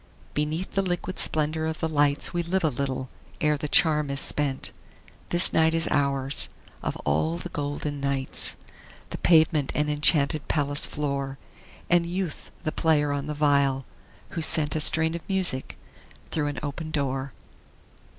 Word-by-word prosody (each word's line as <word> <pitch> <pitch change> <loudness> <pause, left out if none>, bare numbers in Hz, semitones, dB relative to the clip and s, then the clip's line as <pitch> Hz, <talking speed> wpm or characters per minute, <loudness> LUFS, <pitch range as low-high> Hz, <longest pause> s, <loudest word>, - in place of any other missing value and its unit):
Beneath 155 +5 -2
the 195 - 0
liquid 185 -1 -3
splendor 155 +1 +1
of 160 -1 -4
the 160 - -1
lights 145 -1 +1
We 175 - 0
live 180 +2 -1
a 160 - +3
little 130 -1 -3 0.3
ere 150 -1 +2
the 150 +1 -4
charm 150 -3 +4
is 140 0 -2
spent; 140 -2 0 0.6
This 175 0 +5
night 160 0 +3
is 165 0 +1
ours, 140 -1 0 0.3
of - - -3
all 80 +3 0
the - - -7
golden 145 0 -4
nights, 140 -1 0 0.6
The - - -6
pavement 160 -4 +3
an 150 0 0
enchanted 150 0 +2
palace 145 -1 +1
floor, 140 -2 -3 0.5
And 170 -1 +2
Youth 180 -2 -4
the 155 - -2
player 150 -3 +1
on 145 0 -3
the 150 - -4
viol, 140 -3 +1 0.4
who 165 - -5
sent 150 -2 +6
A - - 0
strain 160 +1 +4
of 170 - -5
music 185 -9 +1 0.5
through 150 -2 -1
an 145 - -4
open 155 +2 -5
door. 140 -3 -2
150 Hz, 160 wpm, -25 LUFS, 140-160 Hz, 0.6 s, sent